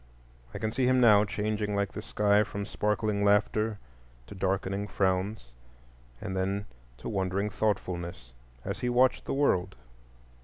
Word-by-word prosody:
I - - -6
can 110 +1 -2
see 125 +2 +1
him 130 0 +4
now, 105 -4 +6
changing 105 0 -2
like 100 -1 0
the 105 - -6
sky 105 -1 +2
from 100 -1 -5
sparkling 105 -1 0
laughter 105 +1 +2 0.5
to - - -10
darkening 95 +1 -1
frowns, 95 - -1 0.7
and 95 - -5
then 95 +2 -1 0.3
to - - -8
wondering 100 0 -1
thoughtfulness 85 - -2 0.3
as - - -3
he 125 - -1
watched 125 +1 +3
the - - -2
world. 115 - +1
100 Hz, 145 wpm, -29 LUFS, 95-110 Hz, 0.7 s, now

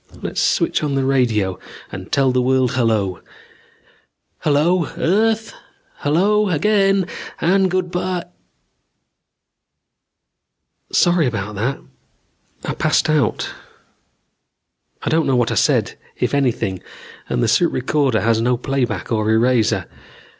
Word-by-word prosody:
Let's - - -3
switch - - +1
on 145 -2 -1
the 135 -1 0
radio 110 -9 +1 0.3
and 95 0 -8
tell 135 -2 +3
the 125 0 +1
world 130 0 +2
hello. 110 -7 0 1.2
Hello, 160 +3 +2
earth... 220 +6 +1 0.4
hello, 200 +8 +2
again... 195 +3 +2 0.3
and 190 +2 +2
good 180 -1 -1
by... 180 0 -2 2.7
"Sorry 175 -4 +3
about 105 -3 -3
that. 115 +7 -2 0.9
I - - -2
passed - - +1
out. 150 -2 0 1.5
I - - -1
don't 160 0 +2
know 135 - +2
what 120 -2 +1
I - - 0
said, - - +1 0.2
if - - -1
anything, 120 -9 0 0.5
and - - 0
the - - +2
suit 140 +10 +3
recorder 130 -2 0
has 115 0 +2
no 125 +1 +1
playback 125 -6 -2
or 110 -1 0
eraser. 115 0 +2
135 Hz, 120 wpm, -19 LUFS, 115-175 Hz, 2.7 s, tell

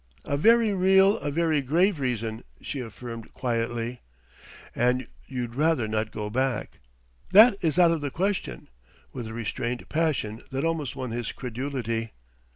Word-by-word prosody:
"A 140 - -1
very 225 +6 +4
real, 190 +2 +4
a - - -3
very 160 0 +1
grave 170 +6 +2
reason," 115 -3 -2 0.2
she 140 - -5
affirmed 115 -1 -8
quietly. 120 0 -2 0.7
"And 125 +2 +1 0.2
you'd 125 -3 -4
rather 150 -3 +2
not 110 0 -1
go 105 -1 -4
back 130 0 -1 0.2
" - - -37 0.3
"That 220 +4 +9
is 160 -2 +1
out 175 -2 +6
of 165 -2 -1
the 145 - -2
question!" 185 - -2 0.5
with 120 -3 -5
a 110 - -7
restrained 120 +2 -3
passion 140 -9 -1
that 135 +3 -2
almost 160 -6 -1
won 125 -3 -4
his 120 -1 -3
credulity. 120 -3 -4
130 Hz, 155 wpm, -26 LUFS, 115-165 Hz, 0.7 s, That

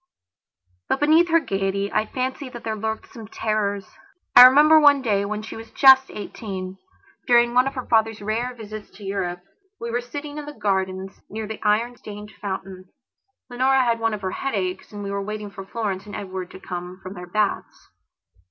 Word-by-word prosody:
But, - - +1
beneath 315 +4 +5
her 335 0 +5
gaiety, 195 -4 -2
I 215 - +1
fancy 260 +1 -3
that 240 -1 -10
there 220 -1 -2
lurked 220 +1 -4
some 225 -3 -9
terrors. 205 -3 -2 0.5
I 250 - +12
remember 300 +4 +7
one 285 -2 +5
day, 200 -4 +1
when 215 +1 -4
she 220 - -8
was 225 0 -9
just 265 0 +6
eighteen, 190 -3 -7 0.5
during 240 0 +4
one 250 +2 +4
of 270 - -4
her 255 - -4
father's 225 -1 +2
rare 230 +4 -2
visits 215 -2 -9
to 205 - -12
Europe, 185 -3 -3 0.4
we 235 - -4
were 240 +1 0
sitting 290 +4 -7
in 295 - -7
the 295 - -7
gardens, 190 -1 -2
near 220 +1 -5
the 220 +1 -7
iron 225 +3 +1
stained 210 -1 -9
fountain. 190 -2 -5 0.6
Leonora 260 +1 +2
had 235 -2 +1
one 225 -1 0
of 205 - -10
her 185 - -1
headaches 190 -8 -3
and 205 -1 -7
we 200 - -4
were 200 0 -2
waiting 210 0 -5
for 195 -1 -9
Florence 205 -3 -3
and 205 - -7
Edward 185 -2 -5
to - - -11
come 180 0 -7
from 185 +1 -7
their 180 -2 -9
baths. 210 +2 -2
215 Hz, 190 wpm, -23 LUFS, 195-245 Hz, 0.6 s, I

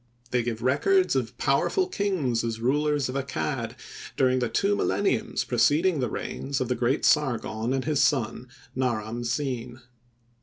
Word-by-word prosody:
They 125 - +2
give 115 -1 -4
records 370 - +3
of - - -2
powerful 380 -2 +2
kings 180 - -1
as 115 -1 -3
rulers 145 +3 +1
of 130 - -5
Accad 130 -3 -3 0.4
during 130 -1 +3
the 120 -2 -1
two 200 +1 +1
milleniums 215 +2 0
preceding 145 +8 +2
the 125 - 0
reigns 140 +1 -4
of 130 -2 -2
the 125 - +1
great 125 +4 0
Sargon 120 -5 +1
and 135 0 -1
his 150 -2 +1
son, 125 -3 0 0.3
Naram 120 -2 -2
Sin. 125 -1 -3
130 Hz, 150 wpm, -26 LUFS, 120-150 Hz, 0.4 s, records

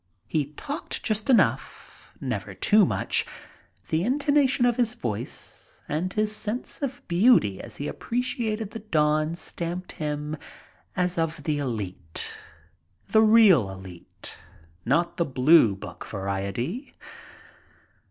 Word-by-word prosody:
He 140 +5 -1
talked 285 - -3
just 215 +2 0
enough, 255 - +1
never - - -4
too 210 -3 +5
much. - - +2 0.7
The 160 +2 +1
intonation 275 0 +2
of 240 -1 +2
his 240 -1 +1
voice 110 - -6
and 165 +5 -1
his 215 0 0
sense 220 +7 -4
of 275 -2 -4
beauty 175 - +4
as - - -8
he 145 - -4
appreciated 230 -3 -2
the 225 - -6
dawn 155 -5 +1
stamped 175 +1 -5
him 150 -1 -3 0.6
as 180 -1 0
of 165 0 -2
the 150 -2 0
elite 100 - -3 0.4
— 95 +2 -40
the 220 - +6
real 215 - +6
elite, 95 -2 -10 0.5
not 165 +8 +1
the 170 - +3
Blue 130 -5 +5
Book 90 -2 -9
variety. 100 - -4
170 Hz, 125 wpm, -26 LUFS, -, 0.7 s, the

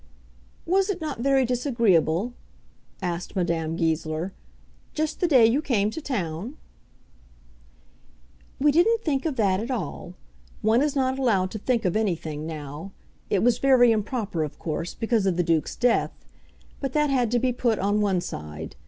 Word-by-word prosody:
"Was 385 +3 +2
it 385 -3 -1
not 305 -6 -4
very 270 +1 +3
disagreeable," 230 - +1 0.7
asked 175 +1 -4
Madame 165 -3 -1
Goesler, 160 +2 -1 0.6
"just 310 0 -2
the 355 - +2
day 260 -8 +6
you 240 +6 +3
came 215 -8 +1
to 320 - -6
town?" 210 - -4 2.0
"We 295 +2 +4
didn't 450 +9 +3
think 285 -1 0
of 300 - -2
that 195 -5 +2
at 230 +4 -4
all. 220 -7 -4 0.5
One 220 +3 +4
is 295 -1 0
not 260 -1 0
allowed 195 -8 +1
to 215 - -5
think 235 0 0
of 180 - +1
anything 160 -7 -2
now. 155 +4 -7 0.4
It 195 - +1
was 245 0 +3
very 255 -3 +5
improper, 210 -5 -1
of 150 - -6
course, 165 +1 -4
because 225 -3 0
of 180 -2 +1
the 175 - +2
Duke's 165 -2 0
death; 245 -1 0 0.5
but 270 -2 -3
that 300 -1 +2
had 250 -4 +2
to 245 - +1
be 250 +1 +1
put 235 -2 +1
on 205 +2 +1
one 195 -4 +1
side. 75 - -7
225 Hz, 160 wpm, -25 LUFS, 175-265 Hz, 2.0 s, day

